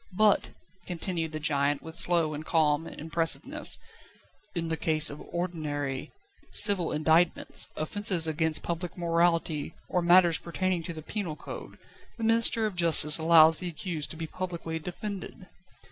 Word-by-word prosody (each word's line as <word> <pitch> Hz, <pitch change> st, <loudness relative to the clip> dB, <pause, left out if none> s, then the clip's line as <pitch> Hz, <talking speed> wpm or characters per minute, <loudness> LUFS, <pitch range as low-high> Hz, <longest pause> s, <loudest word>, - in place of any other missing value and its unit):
But," 215 Hz, -1 st, +3 dB, 0.4 s
continued 170 Hz, -2 st, -4 dB
the 155 Hz, -, -5 dB
giant, 145 Hz, -2 st, -1 dB
with 160 Hz, -, -9 dB
slow 170 Hz, -2 st, +1 dB
and 150 Hz, +1 st, -6 dB
calm 155 Hz, 0 st, 0 dB
impressiveness, 165 Hz, +1 st, 0 dB, 0.8 s
"in 165 Hz, -1 st, -3 dB
the 160 Hz, -, -1 dB
case 155 Hz, -1 st, +3 dB
of 145 Hz, -, -10 dB
ordinary, 150 Hz, -6 st, -5 dB, 0.4 s
civil 185 Hz, -5 st, +7 dB
indictments, 160 Hz, +3 st, +2 dB
offences 180 Hz, +1 st, -1 dB
against 160 Hz, 0 st, 0 dB
public 170 Hz, +1 st, -5 dB
morality 165 Hz, -3 st, -1 dB
or 180 Hz, -, -1 dB
matters 175 Hz, -1 st, +4 dB
pertaining 180 Hz, +1 st, -3 dB
to 170 Hz, -, -6 dB
the 155 Hz, -1 st, -10 dB
penal 185 Hz, -4 st, -5 dB
code, -, -, -10 dB, 0.4 s
the 230 Hz, -, -6 dB
Minister 225 Hz, 0 st, +2 dB
of 210 Hz, -, -3 dB
Justice 165 Hz, -3 st, +3 dB
allows 160 Hz, 0 st, +5 dB
the 180 Hz, -, -4 dB
accused 160 Hz, -2 st, -5 dB
to 160 Hz, -, -8 dB
be 165 Hz, -, -5 dB
publicly 170 Hz, -1 st, -6 dB
defended. 185 Hz, +3 st, -8 dB
165 Hz, 145 wpm, -27 LUFS, 155-180 Hz, 0.8 s, civil